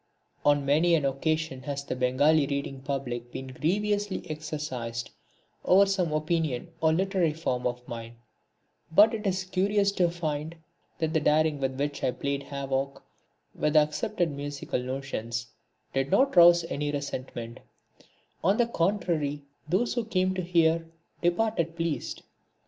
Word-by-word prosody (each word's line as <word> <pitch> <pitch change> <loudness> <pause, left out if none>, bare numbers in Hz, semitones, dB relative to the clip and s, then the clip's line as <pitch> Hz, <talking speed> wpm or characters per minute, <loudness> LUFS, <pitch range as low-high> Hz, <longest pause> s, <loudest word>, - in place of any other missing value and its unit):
On 145 -1 +3
many 160 +5 +4
an 150 -4 +1
occasion 155 0 -1
has 140 +1 -4
the 125 - -4
Bengali 140 +4 +3
reading 140 -1 -3
public 125 -3 -4
been 130 0 -6
grievously 205 +7 -1
exercised 140 -7 -4 0.5
over 195 +2 +6
some 190 -4 0
opinion 155 -2 -1
or 160 0 +4
literary 180 -2 +1
form 125 -6 -1
of 125 0 -5
mine, 115 0 -7 0.8
but 210 +7 +6
it 215 -2 -2
is 190 0 0
curious 200 +2 +1
to 180 -3 +2
find 160 -2 -3 0.4
that 160 -1 -1
the 160 - +3
daring 155 0 +2
with 135 -1 -2
which 145 0 -2
I - - +1
had 125 - -3
played 140 0 -1
havoc 140 -1 -3 0.5
with 150 +1 -1
accepted 155 +4 +2
musical 145 -2 -4
notions 125 -3 -4 0.5
did 135 0 0
not 270 - +3
rouse 170 -1 +8
any 150 -3 -2
resentment; 130 -5 -5 0.8
on 195 +5 +3
the 240 - +4
contrary 170 -8 0 0.3
those 200 +8 +1
who 240 - -1
came 185 -4 +1
to 185 - -2
hear 165 -2 +3 0.4
departed 175 -2 +1
pleased. 165 -2 -3
155 Hz, 145 wpm, -28 LUFS, 135-175 Hz, 0.8 s, rouse